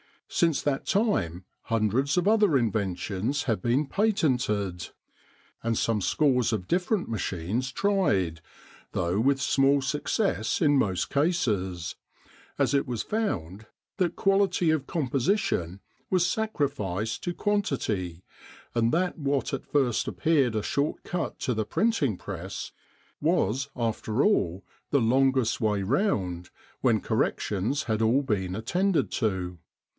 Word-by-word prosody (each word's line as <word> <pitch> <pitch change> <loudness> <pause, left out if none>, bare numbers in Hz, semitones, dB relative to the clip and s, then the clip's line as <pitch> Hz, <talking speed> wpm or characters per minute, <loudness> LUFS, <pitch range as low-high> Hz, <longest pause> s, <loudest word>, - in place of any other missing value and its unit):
Since 165 -4 +2
that 140 -2 -1
time 140 - +1 0.2
hundreds 115 - +1
of 180 - +2
other 210 -8 +4
inventions 105 +3 -1
have 110 -7 -1
been 125 +8 +2
patented, 125 - 0 0.7
and 115 -1 0
some 115 -2 +1
scores 125 - +2
of 95 -4 -3
different 180 +3 +1
machines 110 +4 -2
tried, 100 - +1 0.5
though 90 +3 0
with 135 +3 +2
small 135 +1 +3
success 145 - 0
in 145 -3 +4
most 95 -8 0
cases; 105 - 0 0.6
as - - +2
it 140 +1 +2
was 120 -3 -2
found 110 - -3 0.3
that 175 -3 0
quality 195 -4 +2
of 150 -4 -1
composition 130 - 0 0.3
was 180 -2 +3
sacrificed 115 - -1
to 175 - -1
quantity, 110 - -1 0.5
and 115 0 +2
that 175 +1 0
what 140 -1 -1
at 135 - -4
first 130 -6 +1
appeared 140 -8 +2
a 105 - 0
short 140 +6 -1
cut 175 -1 -3
to 125 - -1
the 110 -1 -1
printing 150 - +1
press 95 0 -6 0.5
was 130 +8 +1
after 115 +1 -1
all 95 - +1 0.3
the 140 - +3
longest 130 0 +2
way 105 -3 +1
round, 95 - 0 0.3
when - - +2
corrections 110 +9 0
had 110 -2 -1
all 120 +6 +3
been 95 -7 -1
attended 175 - 0
to. 95 -7 -2
125 Hz, 125 wpm, -27 LUFS, 100-155 Hz, 0.7 s, other